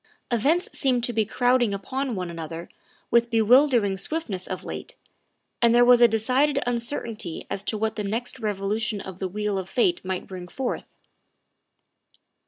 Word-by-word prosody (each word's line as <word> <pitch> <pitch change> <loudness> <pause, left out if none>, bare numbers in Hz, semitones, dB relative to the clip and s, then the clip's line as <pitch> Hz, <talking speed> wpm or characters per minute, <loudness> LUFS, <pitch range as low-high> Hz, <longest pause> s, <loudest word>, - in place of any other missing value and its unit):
Events 295 - +2
seemed 255 -4 +1
to 240 - 0
be 220 -1 +1
crowding 245 -1 +2
upon 260 +5 -3
one 180 -2 -4
another 165 0 -7 0.4
with 235 0 +4
bewildering 230 -2 +4
swiftness 200 - -3
of 185 - -5
late, - - -7 0.7
and 235 0 +5
there 245 0 +6
was 245 0 +6
a 240 - +9
decided 255 +6 +2
uncertainty 235 - -3
as 195 - -1
to 215 +2 -2
what 220 0 -2
the 210 - -2
next 230 +5 -3
revolution 210 +1 -1
of 190 -1 -8
the 190 - -2
wheel 205 +1 -2
of 190 0 -7
fate 350 +8 +1
might 185 -1 -3
bring 180 -2 -8
forth. 260 +7 -4
225 Hz, 160 wpm, -25 LUFS, 195-245 Hz, 0.7 s, a